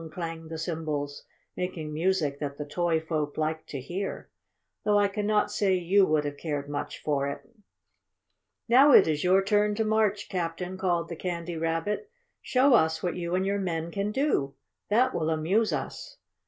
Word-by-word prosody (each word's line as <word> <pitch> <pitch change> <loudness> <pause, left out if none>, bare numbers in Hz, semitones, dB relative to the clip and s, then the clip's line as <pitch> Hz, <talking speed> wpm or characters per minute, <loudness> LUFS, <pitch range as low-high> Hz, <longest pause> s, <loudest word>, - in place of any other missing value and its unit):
clanged 165 -2 -6
the 160 - -5
cymbals, 155 -3 -4 0.3
making 165 -4 -4
music 160 -4 0
that 140 -1 -4
the 150 - -4
Toy 170 +2 0
Folk 155 -2 -3
liked 155 0 -2
to 140 - -4
hear, 180 +9 -5 0.5
though 210 -1 +3
I 205 0 +4
cannot 210 +1 0
say 195 -2 +2
you 185 +2 +3
would 155 -1 +1
have 145 0 -4
cared 145 -2 -3
much 145 0 -4
for 140 -2 0
it. 140 - -6 1.2
"Now 265 +4 +7
it - - +8
is 150 -2 0
your 190 +2 +4
turn 210 +1 +2
to 220 +1 0
march, 215 -2 +1
Captain!" 180 +1 -3
called 175 -3 0
the 170 - -6
Candy 170 0 -4
Rabbit. 165 - -2 0.3
"Show 260 +1 +3
us 160 -7 +3
what 175 -2 -1
you 175 0 -2
and 185 +1 +1
your 200 +1 0
men 170 -3 -2
can 200 +2 -2
do. 210 - 0 0.3
That 250 +5 +3
will 160 -1 -1
amuse 175 +8 +1
us." - - -5
175 Hz, 175 wpm, -27 LUFS, 155-200 Hz, 1.2 s, it